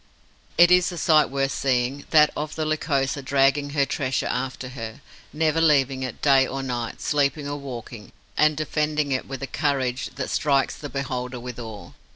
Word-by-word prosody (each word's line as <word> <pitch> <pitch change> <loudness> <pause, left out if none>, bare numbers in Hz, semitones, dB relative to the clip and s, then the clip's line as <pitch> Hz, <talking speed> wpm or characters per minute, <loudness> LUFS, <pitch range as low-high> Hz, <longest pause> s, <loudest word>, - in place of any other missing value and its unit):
It 175 +1 +7
is 180 0 +5
a 175 - -7
sight 155 -3 +4
worth 135 0 0
seeing, 130 +1 -1
that 150 -1 +6
of 150 +1 -4
the 155 - -2
Lycosa 145 -3 0
dragging 140 +1 +2
her 140 -1 +1
treasure 135 -2 -1
after 130 0 -3
her, 115 -3 -7 0.3
never 160 +1 +1
leaving 135 -4 +3
it, 130 -3 -6
day 135 -2 +5
or 135 0 -4
night, 120 -3 -4
sleeping 145 0 0
or 145 0 -3
waking, 120 -5 -8 0.2
and 155 -1 +3
defending 150 -1 -1
it 130 - -1
with 135 0 -6
a - - 0
courage 130 -2 -1
that 130 - -4
strikes 140 -2 +1
the 145 - -8
beholder 125 -2 -4
with 125 0 -7
awe. 110 -3 -8
140 Hz, 180 wpm, -24 LUFS, 130-150 Hz, 0.3 s, It